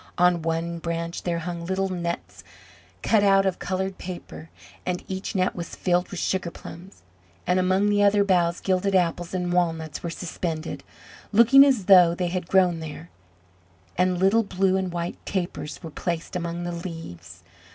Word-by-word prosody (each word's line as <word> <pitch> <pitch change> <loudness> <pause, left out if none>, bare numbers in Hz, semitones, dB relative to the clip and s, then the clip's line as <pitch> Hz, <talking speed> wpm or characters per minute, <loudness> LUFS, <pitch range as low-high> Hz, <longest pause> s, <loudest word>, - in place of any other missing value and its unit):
On 180 -1 +3
one 165 +1 -2
branch 170 0 -4
there 170 -1 -1
hung 170 0 -5
little 190 +2 -1
nets 170 - -5 0.6
cut 220 -2 +3
out 195 -1 +5
of 190 -2 -1
coloured 190 +1 -3
paper, 175 -3 -8 0.3
and 180 0 -3
each 190 +3 -5
net 185 -1 +1
was 170 -2 -6
filled 180 0 0
with 185 - -5
sugar 185 -2 -1
plums; 175 - -12 0.4
and 180 +1 +2
among 185 +2 +2
the 205 0 +2
other 205 0 +4
boughs 175 -3 +1
gilded 195 +1 +1
apples 175 0 0
and 180 -1 -1
walnuts 165 -3 -1
were 170 - -4
suspended, 165 -1 -4 0.5
looking 235 +6 +7
as 260 -9 +2
though 180 -3 +7
they 180 -1 -1
had 180 -1 -3
grown 180 -3 +3
there, 160 +1 -8 0.8
and 180 0 +2
little 195 +5 +4
blue 190 -2 +1
and 190 -1 -1
white 170 0 -5
tapers 175 -5 -4
were 165 - -7
placed 170 +2 -4
among 170 0 -3
the 175 - -3
leaves. 90 - -8
180 Hz, 165 wpm, -25 LUFS, 170-190 Hz, 0.8 s, looking